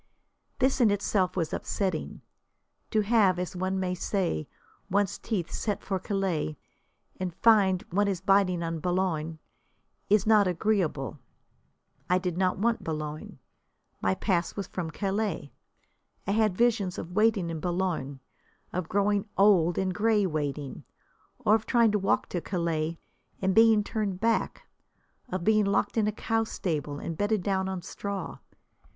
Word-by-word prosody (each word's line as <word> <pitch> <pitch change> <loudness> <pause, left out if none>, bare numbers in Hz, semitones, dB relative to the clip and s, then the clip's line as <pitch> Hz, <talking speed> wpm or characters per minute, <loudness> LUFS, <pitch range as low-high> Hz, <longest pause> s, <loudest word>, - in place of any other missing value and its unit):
This 260 0 +2
in 230 - +6
itself 195 -2 0
was 165 -3 -1
upsetting. 185 -6 -2 0.7
To 215 - +2
have, 205 -4 +3
as 180 0 -4
one 185 +1 -1
may 185 -1 -1
say, 180 - -1 0.4
one's 200 0 +1
teeth 190 -7 -3
set 210 -3 -2
for 190 -1 -2
Calais, 185 - -2 0.6
and 180 -2 -3
find 195 -5 +4
one 205 +3 +2
is 195 -3 -1
biting 190 -2 +2
on 165 -1 -3
Boulogne, 165 -2 -1 0.7
is 205 -1 +4
not 215 -2 +5
agreeable. 175 -7 0 0.9
I 180 - +4
did 180 -2 -2
not 185 0 +1
want 230 +4 0
Boulogne. 155 -1 -5 0.6
My 95 0 +1
pass 180 -4 0
was 200 - -3
from 175 -2 -4
Calais. 195 -4 -2 0.7
I 195 - -1
had 215 -3 +2
visions 220 -6 +2
of 165 - -6
waiting 210 -3 +2
in 160 - -4
Boulogne, 170 -6 -2 0.5
of 180 -2 -3
growing 200 +1 +1
old 185 -4 +4
and 190 -1 0
grey 210 +1 +2
waiting, 145 -4 -3 0.5
or 225 -4 +2
of 220 0 +1
trying 235 -3 +4
to 210 - +1
walk 195 - +1
to 175 - -2
Calais 165 -3 -2 0.4
and 190 0 +1
being 225 0 +6
turned 205 -4 -2
back, 230 +1 0 0.6
of 185 -5 -3
being 215 +1 +4
locked 200 0 +1
in 220 -2 +2
a - - +1
cow 225 +1 0
stable 150 -9 -3
and 165 +2 -6
bedded 205 -2 +1
down 190 -1 0
on 185 -2 -4
straw. 200 -1 -5
190 Hz, 150 wpm, -28 LUFS, 170-210 Hz, 0.9 s, in